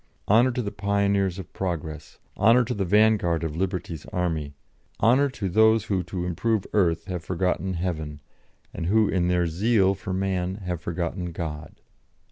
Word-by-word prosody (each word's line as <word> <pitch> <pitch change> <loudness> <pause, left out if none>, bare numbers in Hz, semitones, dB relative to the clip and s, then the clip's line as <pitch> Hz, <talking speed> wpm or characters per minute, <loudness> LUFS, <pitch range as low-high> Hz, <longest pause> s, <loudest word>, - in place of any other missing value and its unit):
Honour 115 +5 +5
to 125 - -2
the 100 - -3
pioneers 100 -2 0
of 95 - -9
progress, 80 -5 -5 0.2
honour 115 +5 +5
to 125 - -2
the 100 -3 -1
vanguard 100 -4 +3
of 80 -2 -3
Liberty's 90 -3 -3
army, 80 -5 -2 0.4
honour 130 +5 +4
to 105 -7 -4
those 110 +3 +4
who 95 -3 -1
to 90 0 -4
improve 100 +4 0
earth 85 -5 +2
have 90 -3 -5
forgotten 90 +1 -1
heaven, 80 -4 -3 0.5
and 85 - -4
who 110 +2 +4
in 90 -2 +1
their 90 -1 +2
zeal 95 +3 +2
for 95 0 -7
man 95 -1 -1
have 90 -5 -5
forgotten 85 +1 -3
God." 80 -2 -6
95 Hz, 160 wpm, -25 LUFS, 85-100 Hz, 0.5 s, Honour